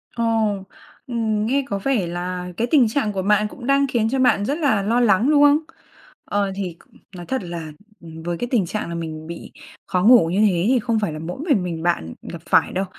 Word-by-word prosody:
Ồ, 235 - -1 0.8
ừm, 220 -3 -1
nghe 275 +5 +1
có 200 -4 -3
vẻ 215 -4 0
là 180 +1 -4
cái 235 - 0
tình 270 -7 +5
trạng 220 -1 -1
của 190 - -2
bạn 210 +2 +2
cũng 240 +3 -11
đang 275 0 +3
khiến 230 -4 0
cho 265 +2 -1
bạn 250 -5 +3
rất 285 +6 -1
là 275 -11 +2
lo 225 +5 +1
lắng, 230 +1 +3
đúng 290 -1 +5
không? 290 0 +6 0.7
Ờ, 200 -1 -1
thì 185 -4 -5 0.4
nói 175 -1 -8
thật 260 -1 -3
là 170 -3 -6 0.5
với 170 0 -3
cái 245 - -3
tình 225 -8 +2
trạng 210 +1 -4
là 170 - -4
mình 160 -1 -6
bị 170 0 -8 0.4
khó 180 -1 0
ngủ 225 -6 +6
như 185 +4 0
thế 190 -5 +3
thì 255 +1 +3
không 230 -1 0
phải 205 -7 -2
là 155 - -6
mỗi 170 +7 -6
mình 220 -11 +3
mình 165 -2 -4
bạn 125 - -1
gặp 170 - -9
phải - - +3
đâu, 190 +2 -1
205 Hz, 225 wpm, -21 LUFS, 175-245 Hz, 0.8 s, không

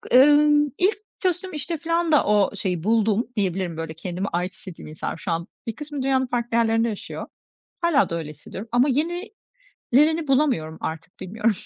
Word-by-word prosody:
ımm, 295 +2 +6
ilk 390 +5 +2 0.2
çalıştığım 370 0 -1
işte 315 +3 -3
filan 335 +1 0
da 295 - +5
o 205 -1 +3
şeyi 180 -5 -2
buldum 220 +1 +2
diyebilirim, 185 -4 -1
böyle, 165 -1 -4
kendimi 180 +4 -4
ait 180 +1 -2
hissettiğim 185 -4 -10
insanlar 155 +1 -5
Şu 175 +2 -4
an 165 +1 -2 0.2
bir 225 - -3
kısmı 295 -2 -5
dünyanın 260 -1 +2
farklı 240 -1 -1
yerlerinde 225 0 +3
yaşıyor. 210 - -6 0.5
Hâlâ 330 -5 +3
da 170 - -2
öyle 160 -3 -5
hissediyorum 185 +8 -9
ama 245 +4 +4
yenilerini 345 - -3 0.8
bulamıyorum 260 - +1
artık, 160 +2 -6
bilmiyorum. 215 +4 0
230 Hz, 165 wpm, -24 LUFS, 180-295 Hz, 0.8 s, ımm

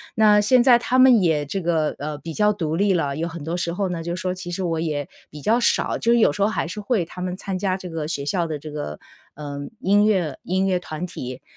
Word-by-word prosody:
那 210 -2 +5
现 240 +4 +4
在 245 -2 +7
他 255 +2 +1
们 255 -5 +7
也 155 -4 +1
这 190 +7 -3
个， 160 -3 0
呃 150 0 -4
比 165 +1 -7
较 210 +3 +3
独 160 -5 -2
立 195 +2 +2
了， 140 -5 0
有 165 +1 -2
很 165 -3 -7
多 165 +3 -3
时 170 -1 -2
候 190 +1 -1
呢， 165 -2 -4
就 170 +1 -3
说 185 0 -2
其 185 -1 -7
实 180 +2 -3
我 165 -2 -1
也 150 -3 -2 0.2
比 150 - -10
较 225 - +2
少 235 - +1
就 235 - +1
是 240 - +4
有 220 - +5
时 175 - -5
候 200 - +4
还 215 - -2
是 210 - -6
会 210 -2 0
他 180 +2 -9
们 180 0 -3
参 195 -1 -4
加 190 -1 -1
这 185 -2 -8
个 160 -2 -4
学 145 -3 -3
校 170 +3 0
的 155 -2 -3
这 155 - -9
个， 110 - -5 0.3
呃， 145 -1 -7 0.2
音 205 -3 +3
乐 180 -9 +1
音 190 +2 0
乐 185 -1 +1
团 175 0 -6
体， 130 -6 -7
175 Hz, 285 characters per minute, -22 LUFS, 155-200 Hz, 0.3 s, 在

